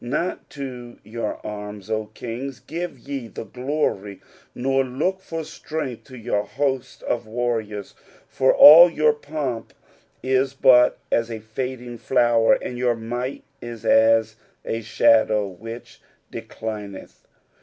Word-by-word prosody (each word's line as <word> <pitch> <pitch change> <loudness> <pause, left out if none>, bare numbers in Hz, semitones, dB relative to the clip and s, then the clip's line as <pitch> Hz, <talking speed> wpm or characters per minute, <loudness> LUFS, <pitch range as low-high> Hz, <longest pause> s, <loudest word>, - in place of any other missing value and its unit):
Not 155 +9 -3
to 125 -3 -7
your 110 0 -4
anns, 105 -2 -7
O 110 -1 -1
kings, 125 +3 -6
give 170 -2 -6
ye 135 -1 -6
the - - -7
glory, 125 -5 -3 0.4
nor 135 +2 +1
look 155 +10 -2
for 165 -3 -5
strength 150 -6 -6
to 130 - -12
jour 115 -3 -1
hosts 130 +4 -3
of 120 -2 -2
warriors, 110 -3 -3 0.3
for 130 - +2
all 170 +4 +10
your 155 -2 +3
pomp 145 -6 -5 0.5
is 130 +1 +1
but 125 -2 +5
as 115 0 +1
a 115 - -4
fading 120 +2 -6
flower, 120 -3 +3
and 125 - -6
your 125 -1 +2
might 120 +4 -5 0.2
is 120 -2 -8
as 110 0 +4 0.3
a 115 - -2
shadow 110 -1 +3
which 115 +5 -10 0.3
declineth. 105 -3 -8
120 Hz, 130 wpm, -23 LUFS, 110-135 Hz, 0.5 s, all